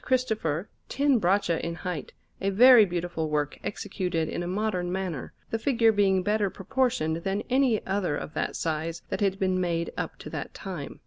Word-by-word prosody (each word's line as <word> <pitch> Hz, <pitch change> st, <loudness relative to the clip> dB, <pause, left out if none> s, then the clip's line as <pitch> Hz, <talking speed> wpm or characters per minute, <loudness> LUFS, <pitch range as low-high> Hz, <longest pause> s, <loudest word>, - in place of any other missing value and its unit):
Cristopher 220 Hz, -, 0 dB, 0.2 s
ten 275 Hz, -2 st, +3 dB
braccia 180 Hz, -3 st, +1 dB
in 170 Hz, 0 st, -3 dB
height, 175 Hz, -5 st, -5 dB, 0.3 s
a 195 Hz, -, +1 dB
very 235 Hz, +2 st, +8 dB
beautiful 175 Hz, -3 st, -3 dB
work 150 Hz, -1 st, -1 dB
executed 180 Hz, -5 st, -2 dB
in -, -, -3 dB
a 175 Hz, -, -3 dB
modern 185 Hz, -2 st, -1 dB
manner, 180 Hz, -7 st, -3 dB, 0.2 s
the 225 Hz, -, 0 dB
figure 230 Hz, -1 st, +3 dB
being 195 Hz, -3 st, +2 dB
better 210 Hz, 0 st, +1 dB
proportioned 195 Hz, -6 st, 0 dB
than 195 Hz, +4 st, -2 dB
any 255 Hz, -4 st, +3 dB
other 190 Hz, -6 st, 0 dB
of 150 Hz, -, -6 dB
that -, -, -2 dB
size 160 Hz, +1 st, -2 dB
that -, -, -3 dB
had 195 Hz, -1 st, +2 dB
been 185 Hz, -1 st, +1 dB
made 170 Hz, -1 st, -1 dB
up -, -, -4 dB
to -, -, -10 dB
that -, -, -6 dB
time. 180 Hz, -8 st, -7 dB
190 Hz, 180 wpm, -27 LUFS, 170-215 Hz, 0.3 s, very